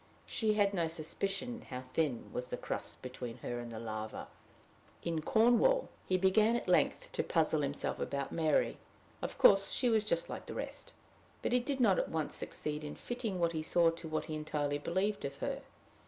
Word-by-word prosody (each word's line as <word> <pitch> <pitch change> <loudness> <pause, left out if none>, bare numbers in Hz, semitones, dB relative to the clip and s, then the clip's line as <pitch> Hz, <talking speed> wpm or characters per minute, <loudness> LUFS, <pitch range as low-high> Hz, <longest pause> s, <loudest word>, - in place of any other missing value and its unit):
She 215 -2 +1
had 200 -1 +3
no 170 -4 +1
suspicion 195 +9 -3
how 125 0 -5
thin 145 -8 0
was 125 0 -2
the - - -4
crust - - -4
between 125 -2 -6
her 120 0 -2
and 120 -1 -6
the 115 - -6
lava. 110 -1 -5 0.7
In 165 -2 -1
Cornwall, 245 - +4 0.2
he 185 - +3
began 210 +5 +4
at 240 - -2
length - - +2
to - - 0
puzzle 160 -2 +2
himself 140 0 -2
about 140 -1 -2
Mary. 160 -3 +2 0.4
Of - - -4
course 195 0 +7
she 250 - +2
was 220 -2 +3
just 170 -6 0
like - - -6
the - - -6
rest! - - -5 0.5
but - - 0
he 250 - +5
did 265 +2 -2
not 210 -7 +5
at - - -1
once 160 -2 -2
succeed 150 0 -4
in 150 - -5
fitting 240 -6 -3
what 170 -1 +2
he 160 -2 -2
saw 165 +1 +4
to 165 0 -7
what 155 0 -2
he 155 - -5
entirely 150 -1 -1
believed 190 +7 0
of 140 0 -4
her. - - -3
165 Hz, 195 wpm, -34 LUFS, 145-215 Hz, 0.7 s, course